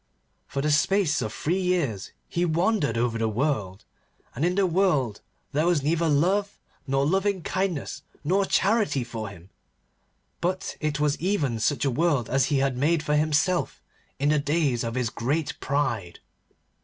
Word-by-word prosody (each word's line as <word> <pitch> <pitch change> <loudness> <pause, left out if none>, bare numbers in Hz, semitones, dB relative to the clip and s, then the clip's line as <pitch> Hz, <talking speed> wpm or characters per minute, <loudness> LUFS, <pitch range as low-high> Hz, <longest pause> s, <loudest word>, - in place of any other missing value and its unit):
For 140 - -3
the 150 - +2
space 175 0 +2
of 110 -3 -3
three 170 +11 -1
years 165 - -1 0.2
he 175 - -1
wandered 170 - +1
over 115 -1 0
the 115 -1 +1
world, 110 -6 -2 0.5
and 145 - -3
in 180 +1 +2
the 200 0 +3
world 160 - +1 0.3
there 150 +3 +1
was 170 -6 +2
neither 165 +2 +1
love 190 +8 +1 0.3
nor 135 +1 +1
loving 190 +2 +1
kindness 175 -8 -2 0.2
nor 190 +6 +2
charity 200 - +2
for 115 -3 -6
him, 90 -1 -14 0.9
but 185 +2 -2
it 155 -1 -1
was 150 -1 +1
even 155 - 0
such 145 +6 +1
a 135 - +2
world 145 -4 +1
as 135 -1 +3
he 145 - +1
had 135 -2 +1
made 155 +4 +2
for 150 -1 +1
himself 155 +4 +1 0.4
in 145 +2 +1
the 150 0 +3
days 145 -4 0
of 115 0 -3
his 125 -2 -1
great 145 +6 -2
pride. 120 -11 -2
150 Hz, 165 wpm, -26 LUFS, 130-175 Hz, 0.9 s, the